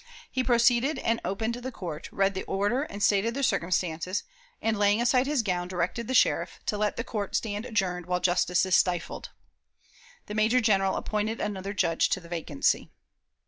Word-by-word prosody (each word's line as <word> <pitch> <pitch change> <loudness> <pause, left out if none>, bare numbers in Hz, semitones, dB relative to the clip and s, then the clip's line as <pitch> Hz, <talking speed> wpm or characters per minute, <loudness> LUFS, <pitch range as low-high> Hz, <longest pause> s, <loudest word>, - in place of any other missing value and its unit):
He 260 - 0
proceeded 245 +4 +3
and 230 0 0
opened 220 +4 -2
the 245 +2 -5
court, 170 -8 -6
read 195 0 +1
the 190 - -3
order 205 +7 0
and 205 -8 -5
stated 215 +4 +2
the 275 - -2
circumstances, 180 -2 0 0.4
and, 220 -2 0
laying 205 +1 +3
aside 250 +2 +3
his 285 -5 +1
gown, 180 -3 -1
directed 185 +5 -2
the 260 - -1
sheriff - - +2
"to 210 - -1
let 210 0 0
the 235 - -3
court 205 -4 -4
stand 215 +1 -2
adjourned 180 -6 -1
while 180 0 0
justice 180 0 +2
is 185 - +3
stifled." 175 -2 0 1.0
The - - -7
major 220 +4 +3
general 195 -5 +2
appointed 215 +1 -2
another 200 -1 -3
Judge 170 -3 +2
to - - 0
the 170 -2 -14
vacancy. 160 -4 0
205 Hz, 180 wpm, -27 LUFS, 180-230 Hz, 1.0 s, proceeded